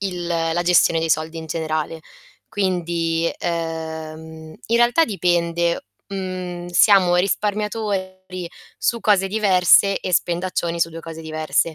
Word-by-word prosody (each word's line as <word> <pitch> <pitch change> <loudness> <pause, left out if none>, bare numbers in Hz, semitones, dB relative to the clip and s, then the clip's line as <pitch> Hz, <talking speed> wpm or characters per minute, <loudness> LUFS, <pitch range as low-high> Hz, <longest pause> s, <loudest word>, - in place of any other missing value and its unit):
il 180 -3 -3
la 165 0 0
gestione 170 -1 +4
dei 165 0 -1
soldi 160 +1 0
in 160 - -6
generale. 160 0 -3 0.5
Quindi, 170 -4 -1
uhm, 160 -1 -5
in 230 - +2
realtà 240 +7 +4
dipende, 170 - 0 0.2
mhmm, 185 -2 -5
siamo 180 0 +5
risparmiatori 195 -2 -2 0.3
su 235 -1 0
cose 200 -3 +3
diverse, 195 -1 +4
e 185 - -1
spendaccioni 170 0 -1
su 165 - +2
2 165 0 -9
cose 165 0 -9
diverse, 155 +1 -1
175 Hz, 125 wpm, -21 LUFS, 165-190 Hz, 0.5 s, siamo